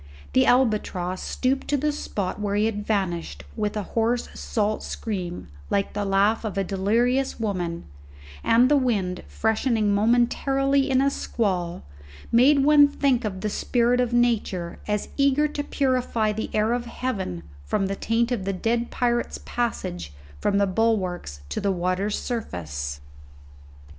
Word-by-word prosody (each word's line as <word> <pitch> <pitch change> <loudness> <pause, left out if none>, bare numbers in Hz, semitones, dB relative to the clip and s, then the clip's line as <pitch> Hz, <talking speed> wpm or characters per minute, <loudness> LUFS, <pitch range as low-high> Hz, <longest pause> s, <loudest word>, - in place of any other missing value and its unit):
The 130 - +4
albatross 210 -7 +1
stooped 265 +1 -1
to 290 - +1
the 300 +2 +1
spot 205 -10 -4
where 205 -1 -1
he 210 +1 +2
had 210 -2 -2
vanished 190 -6 -2
with 210 -1 -2
a 210 - -1
hoarse 235 +1 +1
salt 215 -1 -1
scream 185 -5 -5 0.2
like 200 -1 0
the 205 0 -2
laugh 200 +4 +2
of 210 -3 -4
a 195 - +2
delirious 230 +9 +1
woman, 180 -6 -2 0.6
and 235 +2 +5
the 290 +2 +4
wind, 200 -9 0
freshening 220 -1 +1
momentarily 270 +5 +2
in 260 0 +3
a 275 0 +3
squall, 180 -10 -2 0.5
made 270 +4 +5
one 295 -1 +7
think 275 -3 +1
of 190 -3 -4
the 210 - -1
spirit 245 +2 +2
of 245 -1 0
Nature 225 -8 0
as 210 -1 -1
eager 280 +1 +3
to 290 -1 -3
purify 255 -6 0
the 220 +1 -4
air 215 +2 +1
of 240 0 -2
heaven 195 - -3 0.2
from 70 - 0
the 195 +1 -2
taint 230 +4 0
of 235 -6 -1
the 195 +1 -1
dead 230 +5 -1
pirate's 240 -1 0
passage 90 - -3 0.3
from 200 - +1
the 200 - +4
bulwarks 185 - -1
to - - -3
the 200 0 +1
water's 185 +3 -1
surface. 75 - -4
220 Hz, 155 wpm, -24 LUFS, 195-245 Hz, 0.6 s, one